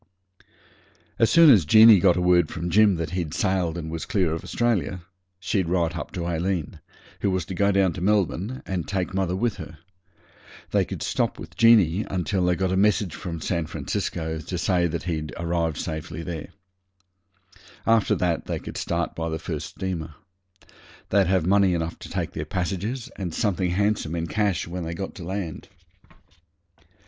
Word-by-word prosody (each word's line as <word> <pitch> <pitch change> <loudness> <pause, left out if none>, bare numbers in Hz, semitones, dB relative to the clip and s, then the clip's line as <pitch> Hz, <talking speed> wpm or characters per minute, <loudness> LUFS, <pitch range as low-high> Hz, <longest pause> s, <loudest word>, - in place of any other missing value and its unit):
As 115 - +4
soon 165 -3 +8
as 105 -9 +6
Jeanie 110 +5 +8
got 90 -1 +4
a - - +1
word 90 -2 +4
from 85 +1 -4
Jim 105 +1 +5
that 80 -2 -4
he'd 85 -5 -3
sailed 90 -4 0
and 80 -2 -5
was 80 -1 -5
clear 90 -6 +1
of 80 - -4
Australia, 95 -7 -1 0.4
she'd 95 -1 -1
write 85 -1 0
up - - -5
to 85 -2 -3
Aileen, 85 -1 -2 0.4
who 100 - 0
was 95 -2 -1
to 95 - -6
go 100 +2 +2
down 95 -3 +2
to 90 - -7
Melbourne, 105 +4 0
and 90 -3 -3
take 95 -1 -2
mother 95 -2 0
with 115 +1 -1
her. 80 -3 -9 0.9
They - - +2
could - - -6
stop - - -1
with - - -10
Jeanie 105 -5 +5
until 95 +1 -1
they 90 0 +2
got 95 0 -1
a - - +1
message 100 -2 +2
from 85 -1 -6
San 85 -3 -1
Francisco 80 0 -3
to 90 +3 -5
say 85 0 +1
he'd - - -6
safely 80 -1 -3
arrived 85 -2 -1 0.4
there. 85 -4 -5 1.4
After 115 -2 +3
that 85 -2 -1
they - - -3
could - - -8
start 85 0 -2
by 80 0 -3
the 80 - -2
first - - -5
steamer. 80 -5 -5 0.9
They'd 100 -2 +3
have 95 -3 +2
money 95 -1 +4
enough 85 0 -3
to - - -9
take - - -3
their - - -5
passages 100 +7 -3
and 90 -5 -4
something 95 -3 0
handsome 100 -3 0
in 85 -1 -2
cash 100 -1 0
when 90 +1 -5
they 85 +1 -4
got 95 +2 -5
to 90 - -9
land. 90 -2 -5
90 Hz, 175 wpm, -24 LUFS, 85-100 Hz, 1.4 s, soon